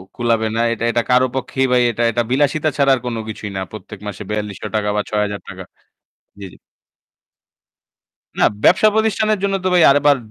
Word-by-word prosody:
কুলাবে 115 -2 0
না। 115 - +1
এটা 115 0 -4
এটা 120 0 +1
কারও 125 +1 +4
পক্ষেই 130 0 -1
ভাই 125 -1 +4
এটা 120 +1 -2
এটা 120 +1 0
বিলাসিতা 145 +3 +1
ছাড়া 140 -1 +3
আর - - -5
কোনো 115 -2 -3
কিছুই 105 -1 -6
না। - - -2
প্রত্যেক 105 -1 -10
মাসে 105 +1 -6
৳৪,২০০ 105 0 -3
বা 105 - +1
৳৬,০০০। 105 -1 -4 2.8
না, - - +3 0.2
ব্যবসাপ্রতিষ্ঠানের 215 +1 +3
জন্য 195 0 +1
তো - - 0
ভাই 175 -2 +5
আবার 145 0 +3
120 Hz, 150 wpm, -18 LUFS, 105-145 Hz, 2.8 s, ভাই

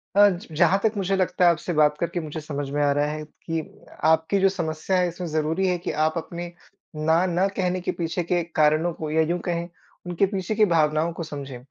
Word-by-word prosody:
अ, 205 0 +7
ज 180 -2 -5
जहाँ 180 +5 +3
तक 220 0 +2
मुझे 195 0 0
लगता 185 -1 +1
है 175 - +7
आपसे 170 +1 -3
बात 150 -1 +4
करके 170 +1 -1
मुझे 155 -1 -5
समझ 145 -2 -4
में 145 +1 -1
आ 145 - +3
रहा 145 +1 +1
है 155 0 -5 0.3
कि 165 -1 0 0.4
आपकी 160 +5 +3
जो 195 0 +4
समस्या 170 0 -2
है 180 -1 +2
इसमें 175 +1 -5
ज़रूरी 160 +4 0
है 180 -1 +1
कि 175 - -4
आप 155 - +1
अपने 170 +1 -5 0.5
ना 160 +3 +2
न 180 +3 +2
कहने 185 -1 0
के - - -1
पीछे 170 +1 -2
के 175 +1 0
कारणों 155 +3 +3
को 155 -1 -5
या 160 +1 +3
यूँ 170 +3 0
कहें 170 -1 -2 0.4
उनके 175 +3 +2
पीछे 195 +1 -3
की 215 0 +5
भावनाओं 160 -2 +2
को 165 - -5
समझें। 140 -4 -7
170 Hz, 225 wpm, -24 LUFS, 155-180 Hz, 0.5 s, अ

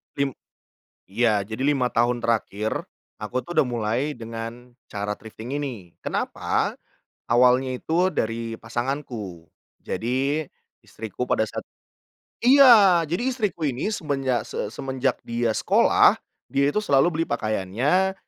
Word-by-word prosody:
Lim 140 -1 0 0.8
iya 105 +1 +1
jadi 110 +5 -5
5 135 -3 +2
tahun 120 +1 +2
terakhir 110 -2 -1 0.4
aku 125 +4 -2
tuh 175 - -6
udah 140 - +4
mulai 115 -1 -1 0.2
dengan 115 +1 -8 0.2
cara 105 0 -3
thrifting 110 +4 -8
ini, 120 -12 -5
kenapa? - - -1 0.6
Awalnya 125 +2 +4
itu 180 +3 +1
dari 115 -2 -2
pasanganku, 115 - -4 0.3
jadi 135 +6 -1 0.4
istriku 110 +2 -5
pada - - +1
saat - - -6 0.8
iya 235 -10 +8
jadi 175 +7 -1
istriku 210 -8 -2
ini 135 - -1
semenjak 135 - -1
se - - -4
semenjak 130 -1 -1
dia 115 -1 0
sekolah, - - +4 0.3
dia 140 0 +2
itu 145 - -3
selalu 140 -5 +4
beli - - +1
pakaiannya 120 - 0
125 Hz, 120 wpm, -24 LUFS, 115-145 Hz, 0.8 s, iya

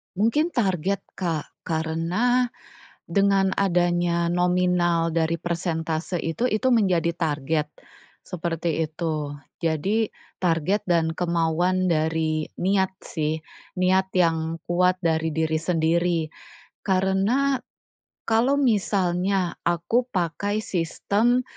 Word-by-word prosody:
Mungkin 230 - +1
target, 195 -3 0 0.2
Kak, 165 -5 -3
karena 170 +10 +1 0.6
dengan 195 +1 +2
adanya 175 -2 +1
nominal 175 -1 +2
dari 165 0 0
persentase 170 -1 -2
itu, 165 +9 -2
itu 250 +1 +1
menjadi 190 -9 +3
target, 150 -1 -1 0.5
seperti 165 -2 -2
itu. 155 -2 -3 0.3
Jadi 195 +8 0 0.2
target 180 +3 0
dan 165 -2 +1
kemauan 175 +2 +1
dari 160 -1 0 0.2
niat 190 0 +2
sih, 155 0 -2 0.4
niat 190 +1 +2
yang 165 -2 +1
kuat 180 +1 +2
dari 160 -2 0
diri 160 0 0
sendiri 165 0 +1 0.5
karena 195 +8 +1 0.7
kalau 235 +5 +3
misalnya 195 -6 +1
aku 175 +9 +1
pakai 200 +2 -1
sistem 205 +8 +1
175 Hz, 95 wpm, -24 LUFS, 165-195 Hz, 0.7 s, menjadi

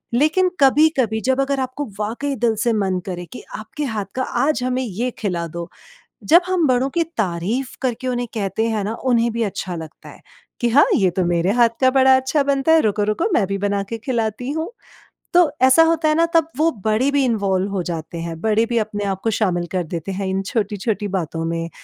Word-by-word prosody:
लेकिन 320 +8 +3
कभी-कभी 265 -6 +3
जब 260 +1 +2
अगर 275 0 0
आपको 260 +3 -3
वाक़ई 245 +7 -2
दिल 230 -2 +3
से 235 -2 +2
मन 190 -3 0
करे 175 -2 -5
कि - - -9
आपके 220 +8 -6
हाथ 205 - -2
का 260 - 0 0.2
आज 305 -4 0
हमें 255 +1 -1
ये 235 +3 -2
खिला 175 -5 -2
दो, 170 0 -5 0.6
जब 340 +4 +6
हम 360 -4 +2
बड़ों 255 +1 +2
की 335 - +3
तारीफ 210 +7 -2
करके 255 0 -2
उन्हें 245 -1 -2
कहते 215 +1 -1
हैं 215 -3 -1
ना 215 - -2 0.2
उन्हें 235 0 +2
भी 235 - -2
अच्छा 185 -1 -5
लगता 160 -2 -10
है - - -15 0.4
कि 240 - +2
हाँ, 285 +5 +6
ये 190 -3 +3
तो 180 +1 -1
मेरे 175 +1 +1
हाथ 230 -1 +3
का 260 - +6
बड़ा 265 0 +5
अच्छा 265 +3 +1
बनता 280 +2 +2
है, 325 - +6
रुको 210 -1 +1
रुको 340 - -1
मैं 200 - +3
भी 195 +1 -3
बना 200 0 0
के 230 - -2
खिलाती 235 0 -2
हूँ। 320 +8 -4 0.6
तो 345 -4 +5
ऐसा 260 +5 +7
होता 325 -1 +2
है 305 - +2
ना 335 +1 +4
तब 325 -1 +4
वो 320 +2 +3 0.2
बड़े 220 +6 +2
भी 280 -1 +2
इनवॉल्व 200 -4 0
हो 195 - -1
जाते 165 -1 -5
हैं, 165 -1 -5
बड़े 220 +1 +2
भी 235 0 -2
अपने 205 -1 -3
आप 195 -1 -2
को 225 - +1
शामिल 180 -5 0
कर 185 -2 -1
देते 170 +3 -5
हैं 195 0 -3
इन 190 +1 -1
छोटी-छोटी 205 0 -2
बातों 165 -2 -3
में, 165 0 -3
225 Hz, 215 wpm, -20 LUFS, 195-265 Hz, 0.6 s, ऐसा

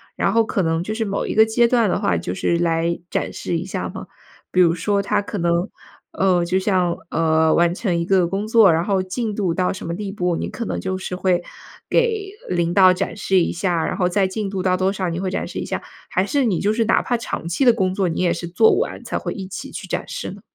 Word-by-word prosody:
然 - - +1
后 225 0 +3
可 200 - -1
能 165 -1 0
就 215 - -4
是 225 +1 -1
某 200 -2 -2
一 - - -3
个 220 - +7
阶 230 +2 +3
段 230 -3 +2
的 - - 0
话 90 - +1
就 85 +2 -4
是 170 - 0
来 170 0 0
展 - - -2
示 - - -2
一 - - -4
下 - - -4
吗？ - - -8 0.4
比 185 - +4
如 170 -1 +5
说 200 +4 0
它 200 - 0
可 205 0 -6
能 170 +2 0 0.4
呃， 185 -2 +2
就 180 +2 +1
像， 185 -3 +1
呃， 160 -1 +3
完 170 0 +3
成 190 -4 -1
一 - - 0
个 185 -1 +3
工 195 +4 -3
作， 220 -4 +6
然 165 - +1
后 195 -2 +1
进 210 +3 -3
度 190 -5 0
到 180 +1 0
什 190 - -8
么 170 - -3
地 195 +2 -4
步， 180 -3 -1
你 - - -3
可 235 - -5
能 - - -3
就 190 0 -3
是 185 -1 -5
会， 180 -1 +1 0.5
给 440 -5 +1 0.2
领 175 -1 0
导 190 -2 +7
展 180 - -3
示 195 -2 +2
一 - - 0
下， 170 -2 0
然 - - -2
后 180 - +2
再 195 +1 +2
进 195 +1 -3
度 190 -2 -3
到 185 -1 +2
多 190 +1 +1
少， 190 -2 -2
你 165 +1 -3
会 190 0 -2
展 185 - -2
示 - - -6
一 - - -4
下？ - - -4 0.3
还 185 - +1
是 275 +5 +1
你 195 -7 +1
就 210 +2 +1
是 225 0 +1
哪 - - +3
怕 240 - 0
长 225 -7 -5
期 180 +11 0
的 240 - +7
工 190 -4 0
作， 190 -1 0
你 165 - -2
也 175 -2 +2
是 170 - -5
做 415 - +4
完 - - -3
才 - - -3
会 - - -4
一 195 -3 -6
起 190 - -7
去 - - -7
展 - - -3
示 - - -5
呢？ - - -11
185 Hz, 285 characters per minute, -21 LUFS, 175-210 Hz, 0.5 s, 个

